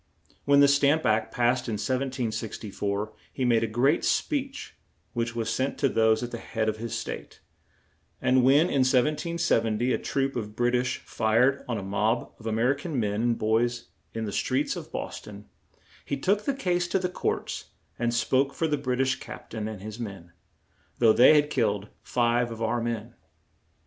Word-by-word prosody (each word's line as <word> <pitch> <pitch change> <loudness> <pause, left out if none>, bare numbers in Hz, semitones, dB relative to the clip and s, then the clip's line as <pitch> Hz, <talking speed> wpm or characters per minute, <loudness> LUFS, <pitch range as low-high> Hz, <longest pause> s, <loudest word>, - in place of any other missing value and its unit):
When 140 0 +5
the 140 - +7
"Stamp 140 +2 +3
Act" 110 0 +1
passed 125 0 +1
in 115 - -2
1764, 110 -4 -3 0.2
he 130 - -2
made 115 -2 +3
a - - +1
great 125 +8 +2
speech, 275 -1 -1 0.4
which 120 0 -2
was 115 -2 -2
sent 130 +4 -1
to 140 - +2
those 110 0 +3
at 120 - -5
the 120 - -5
head 110 -1 -2
of 110 0 0
his 115 0 -4
State; - - -7 0.8
and 130 0 +3
when, 135 +4 +6
in 160 -4 +1
1770, 130 -3 +1
a - - 0
troop 135 0 -1
of 105 -3 -4
Brit 120 +1 +1
ish 125 +1 +1
fired 120 +5 +2
on 120 -3 -1
a 100 - -5
mob 105 +4 -1
of 115 - -8
A - - 0
mer 115 +5 +2
i - - -8
can 155 -6 -3
men 105 -1 0
and 120 -1 +1
boys 115 +2 0 0.2
in 115 0 -4
the 105 - -4
streets 135 +7 0
of - - -8
Bos - - -5
ton, 105 0 -11 0.6
he 140 - -3
took 200 +9 +1
the 280 - 0
case 180 -8 0
to 175 - +1
the 185 -1 0
courts, 180 - -3 0.3
and 120 0 +1
spoke 130 +4 +1
for 165 - 0
the 150 -2 0
Brit 130 -2 -1
ish 130 0 +1
Cap - - -10
tain 110 -1 -3
and 105 -3 -7
his 110 +2 -7
men, 95 -7 -7 0.7
though 115 -2 +5
they 130 +7 +7
had 150 0 +3
killed 105 -5 0
five 120 0 +1
of 115 -1 -7
our 115 +1 0
men. 115 0 -3
120 Hz, 190 wpm, -27 LUFS, 110-135 Hz, 0.8 s, the